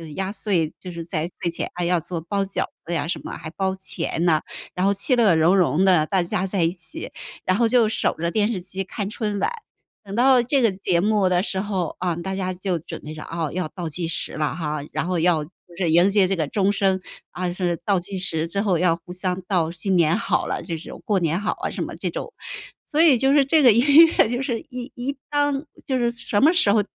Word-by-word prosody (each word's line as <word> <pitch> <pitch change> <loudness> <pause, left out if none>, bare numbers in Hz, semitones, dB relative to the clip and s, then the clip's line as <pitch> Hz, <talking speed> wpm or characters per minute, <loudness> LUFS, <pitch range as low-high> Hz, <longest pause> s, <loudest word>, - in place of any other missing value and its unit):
压 190 0 -2
岁， 190 -7 -1
就 180 - -8
是 170 -1 -6
在 165 -1 -2
睡 170 -2 0
前 - - -3
啊， 175 - -3
要 175 -1 +2
做 170 0 -4
包 200 +4 -1
饺 195 - -2 0.2
子 170 - -3
呀 145 -2 -1
什 - - -3
么， - - -6
还 155 - -7
包 190 +1 -1
钱 175 -2 -2
呢， 160 -2 +3 0.3
然 180 +1 0
后 200 - +3
其乐融融 190 - +3
的， 175 -5 +4
大 190 -3 +1
家 180 +2 -1
在 185 -3 0
一 165 - +2
起， 195 - -5 0.3
然 185 - +2
后 235 - +3
就 235 -2 +4
守 220 - 0
着 170 +1 -2
电 215 +3 +1
视 185 -5 -3
机 190 +2 -5
看 200 +1 -5
春 210 -3 -3
晚。 480 - 0 0.5
等 200 -1 -9
到 255 0 +5
这 270 +2 +1
个 225 -4 +4
节 185 -2 0
目 205 -2 +2
的 180 0 +2
时 190 -3 -2
候， 190 -4 -2
啊， 175 -2 -1
大 190 +3 -4
家 185 -1 -2
就 180 -1 -2
准 - - -8
备 155 +1 -8
着， 155 - -8
啊， 165 -3 -3
要 180 -2 -2
倒 175 -4 -5
计 165 +2 -2
时 165 - -3
了 155 0 -1
哈， 150 -3 -3
然 - - -2
后 180 -1 0
要 165 -2 +2
就 150 - -12 0.3
是 175 -3 0
迎 175 +5 +5
接 195 -2 +4
这 195 - 0
个 155 -4 -1
钟 200 +4 +1
声， 195 -2 +1 0.3
啊， 180 -1 -3
是 175 -2 -1
倒 195 -3 +2
计 190 +1 -5
时， 165 -3 +1
之 200 +4 -1
后 190 -5 +1
要 165 -1 +3
互 175 +1 -13
相 185 0 -2
道 170 -4 +1
“新 185 +2 -1
年 165 +1 +4
好 230 +1 0
了” - - -3
这 165 -3 -4
种， 155 - -10
“过 200 -3 +2
年 170 +3 0
好 215 - -2
啊” - - -1
什 - - -2
么 - - -6
这 - - -3
种。 - - -6 0.5
所 310 +1 +1
以 300 -7 +6
就 270 +3 +3
是 285 -2 +5
这 305 +1 +3
个 245 - +8
音 285 +8 +7
乐 320 -8 +2
就 245 +2 -1
是 240 -5 -2
一 250 +1 -7
一 270 +3 -4
当 290 0 0 0.2
就 260 -2 +1
是 240 -1 +1
什 230 -3 -1
么 320 +5 +6
时 210 - +4
候 210 -1 +3
190 Hz, 270 characters per minute, -23 LUFS, 170-215 Hz, 0.5 s, 个